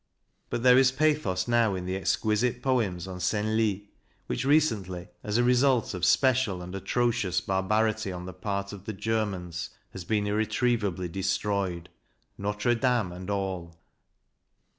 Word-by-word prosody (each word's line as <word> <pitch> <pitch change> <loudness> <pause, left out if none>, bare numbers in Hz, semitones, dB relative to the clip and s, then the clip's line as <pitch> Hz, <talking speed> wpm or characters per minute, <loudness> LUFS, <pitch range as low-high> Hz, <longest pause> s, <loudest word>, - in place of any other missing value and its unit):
But 120 - -3
there 125 0 +7
is 130 -1 +5
pathos 135 -10 +1
now 115 -4 +3
in 90 -1 -4
the 95 +1 -2
exquisite 110 +4 0
poems 105 -10 0
on 90 -1 -7
Senlis, 105 +2 0 0.4
which - - -2
recently, 105 - +1
as 105 +1 -1
a 120 - +3
result 125 -1 +3
of 90 -1 -1
special 120 -6 +3
and 90 +1 -8
atrocious 105 -2 0
barbarity 105 +3 0
on 90 0 -6
the 95 - -7
part 100 +1 -3
of 100 -1 -10
the 110 - -4
Germans, 95 -6 -2 0.2
has 95 - -7
been 105 +3 0
irretrievably 105 -3 0
destroyed, 95 -1 -1 0.5
Notre 105 +4 0
Dame 120 -5 +1
and 90 +2 -8
all. 95 -4 -3
105 Hz, 140 wpm, -28 LUFS, 95-115 Hz, 0.5 s, there